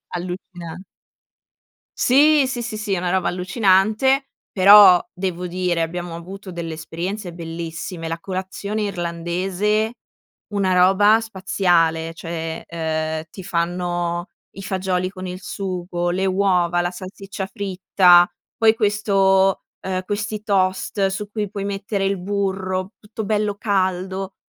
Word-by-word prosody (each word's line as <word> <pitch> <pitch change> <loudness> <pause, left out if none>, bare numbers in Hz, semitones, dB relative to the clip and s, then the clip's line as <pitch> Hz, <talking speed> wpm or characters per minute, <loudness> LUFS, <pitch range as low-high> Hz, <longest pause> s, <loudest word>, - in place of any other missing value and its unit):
allucinan 175 -1 -7 1.1
Sì, 290 +2 +5
sì, 250 -2 -3
sì, 225 -2 -4
sì. 210 -2 -1
Una 180 0 -1
roba 185 0 +1
allucinante, 215 +8 +2 0.2
però 195 -2 +8
devo 180 -1 -3
dire 180 -1 -1
abbiamo 170 +1 -4
avuto 190 +3 -9
delle 170 -2 -5
esperienze 175 +4 -5
bellissime. 165 0 -6
La 165 +1 -3
colazione 190 +3 -4
irlandese, 185 +4 -1 0.6
una 195 -2 +1
roba 195 +4 +5
spaziale. 175 -6 +1
Cioè, 165 -1 -5
ehm, 160 -1 -2
ti 190 - -10
fanno 175 0 -2 0.3
i 195 - -9
fagioli 185 -1 -1
con 185 -1 -7
il 180 +1 -6
sugo, 180 -2 -3
le 190 +2 0
uova, 185 -2 +2
la 175 0 -1
salsiccia 190 +1 -7
fritta. 185 -2 +4 0.3
Poi 220 -1 +5
questo, 195 -3 +2 0.2
ehm, 185 -1 -3
questi 210 +1 -3
toast 195 0 +1
su 195 +2 -4
cui 210 -1 -3
puoi 200 -1 -4
mettere 200 0 -2
il 195 0 0
burro 190 0 -2
tutto 215 0 -7
bello 210 0 0
caldo, 190 -1 -1
185 Hz, 125 wpm, -21 LUFS, 175-200 Hz, 1.1 s, però